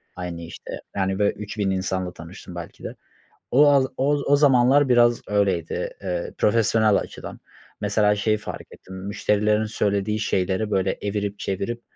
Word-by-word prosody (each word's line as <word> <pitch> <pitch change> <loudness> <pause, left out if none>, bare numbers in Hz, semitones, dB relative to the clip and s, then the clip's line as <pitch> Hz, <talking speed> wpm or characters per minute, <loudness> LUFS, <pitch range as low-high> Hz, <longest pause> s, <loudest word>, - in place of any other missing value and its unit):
Aynı 90 -1 -6
işte, 85 - -8
yani 95 0 -1
böyle 100 0 +2
3.000 105 -1 -3
insanla 95 -1 -2
tanıştım 85 +2 -11
belki 85 -1 -9
de. - - -6 0.6
O 145 +4 +6
a 140 -1 +6 0.2
o 140 +2 +1
o 145 - +5
zamanlar 135 0 +4
biraz 120 -1 +4
öyleydi, 100 -5 0
ııı, 90 -2 -3
profesyonel 110 -1 +3
açıdan. - - -6 0.4
Mesela 105 0 +2
şeyi 110 +1 +1
fark 105 - -7
ettim, 95 - -12
müşterilerin 105 +2 0
söylediği 105 -1 -1
şeyleri 95 +1 0
böyle 95 -1 0
evirip, 100 0 -3
çevirip 110 +5 -3
105 Hz, 145 wpm, -23 LUFS, 95-110 Hz, 0.6 s, O